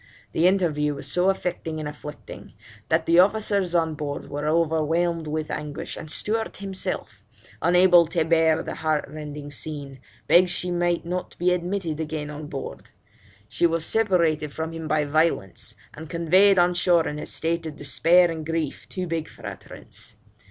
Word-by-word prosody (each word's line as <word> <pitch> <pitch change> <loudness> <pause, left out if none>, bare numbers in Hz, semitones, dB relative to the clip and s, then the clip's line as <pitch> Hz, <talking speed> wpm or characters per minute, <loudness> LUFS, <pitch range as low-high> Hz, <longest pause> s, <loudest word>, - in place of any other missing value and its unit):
The 170 - +3
interview 155 -6 +1
was 140 - -5
so 180 +2 +3
affecting 175 -4 -2
and 155 - -4
afflicting, 150 0 -9 0.4
that 160 0 +2
the 170 +1 +5
officers 200 -2 +2
on 165 -2 +2
board 145 -2 -5
were 145 +1 -3
overwhelmed 165 +1 +1
with 155 0 -3
anguish, 150 0 -5
and 155 - -8
Stewart 220 +7 -2
himself, 195 -1 -4 0.4
unable 180 -1 +6
to 165 0 0
bear 160 -1 +3
the - - -5
heartrending 150 -2 -3
scene, 140 -2 -7 0.3
begged 180 +1 +6
she 180 0 -1
might 175 -1 0
not 180 +1 -4
be 180 +1 +2
admitted 180 -3 -2
again 155 -1 -4
on 150 0 -7
board. 135 -3 -7 0.6
She 170 - +2
was 165 -1 0
separated 170 -9 +2
from 160 +2 -4
him 165 -1 -6
by 155 -1 +1
violence, 150 - 0 0.2
and 160 +1 -9
conveyed 185 +4 +4
on 175 0 +4
shore 175 -2 +3
in 150 0 -4
a - - -6
state 165 0 -1
of 155 - -7
despair 165 +5 +3
and 160 -1 -5
grief 160 -2 -3
too 185 -1 -3
big 165 -2 -3
for - - -14
utterance. - - -9
165 Hz, 165 wpm, -24 LUFS, 150-175 Hz, 0.6 s, unable